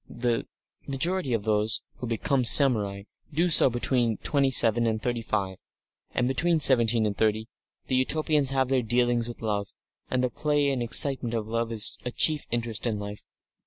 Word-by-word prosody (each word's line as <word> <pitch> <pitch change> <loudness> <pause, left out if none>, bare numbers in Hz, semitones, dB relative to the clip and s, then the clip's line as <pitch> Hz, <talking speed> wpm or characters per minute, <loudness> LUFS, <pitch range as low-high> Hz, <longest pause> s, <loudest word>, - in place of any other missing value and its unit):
The 120 -1 -3 0.4
majority 165 +3 -2
of 115 -3 -2
those 110 +1 0
who 125 - -7
become 125 +3 -1
samurai 110 -7 +3 0.3
do 170 +4 0
so 155 - +6
between 120 -2 -1
twenty 140 -2 0
seven 115 -2 +4
and 110 -1 -2
thirty 120 0 -3
five. 100 -4 -4 0.6
And, 125 - 0
between 165 +5 +1
seventeen 120 -5 +3
and 105 -1 -3
thirty, 110 +1 -1 0.4
the 130 - -1
Utopians 150 +1 +1
have 135 -1 -1
their 135 -1 +1
dealings 120 0 0
with 120 -1 -10
love, 105 -2 -3 0.4
and 130 0 -1
the 125 - -1
play 145 +1 -1
and 130 -2 -3
excitement 120 0 +3
of 110 -2 -4
love 115 +1 -3
is 110 -2 -2
a 125 - -4
chief 150 +4 +1
interest 115 -1 -3
in 110 -2 -2
life. 105 0 -9
120 Hz, 175 wpm, -25 LUFS, 110-135 Hz, 0.6 s, so